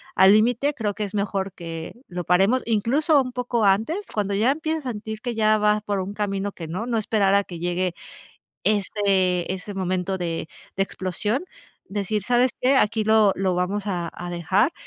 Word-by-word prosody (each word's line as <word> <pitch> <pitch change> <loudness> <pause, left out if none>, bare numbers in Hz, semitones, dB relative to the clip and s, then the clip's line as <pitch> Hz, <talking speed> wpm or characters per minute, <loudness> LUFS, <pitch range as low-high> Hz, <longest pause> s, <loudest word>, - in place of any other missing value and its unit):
al 190 +1 +7
límite, 245 +7 +3
creo 210 -5 -2
que 210 - -3
es 200 - -5
mejor 200 -1 -1
que 165 -2 -7
lo 180 0 -5
paremos", 195 +9 +3
incluso, 275 +7 +3
un 255 -1 -4
poco 240 -3 0
antes, 225 - +1
cuando 205 -2 -1
ya 220 +6 +2
empieza 315 +1 -1
a - - -1
sentir 215 +1 -6
que 245 -2 -3
ya 215 -1 +3
vas 210 0 +2
por 205 -2 -1
un 190 +2 -4
camino 200 -1 -2
que 165 -2 -8
no, 195 +9 -4
no 235 - 0
esperar 205 -2 +2
a 200 - +4
que 175 -3 -9
llegue, 175 +1 -1 0.7
este, 195 -4 +1
ese 190 +2 -6
momento 185 0 -1
de 165 -2 -3 0.3
de 195 - +2
explosión, 205 - -2 0.4
decir: 205 +1 -2
"¿Sabes 245 +4 +3
qué?, 265 +2 +4
aquí 220 -2 +2
lo 215 -2 +4
lo 190 -1 0
vamos 195 +3 -1
a 175 -3 -2
a 175 0 -6
dejar, 185 - +1
205 Hz, 190 wpm, -24 LUFS, 185-225 Hz, 0.7 s, al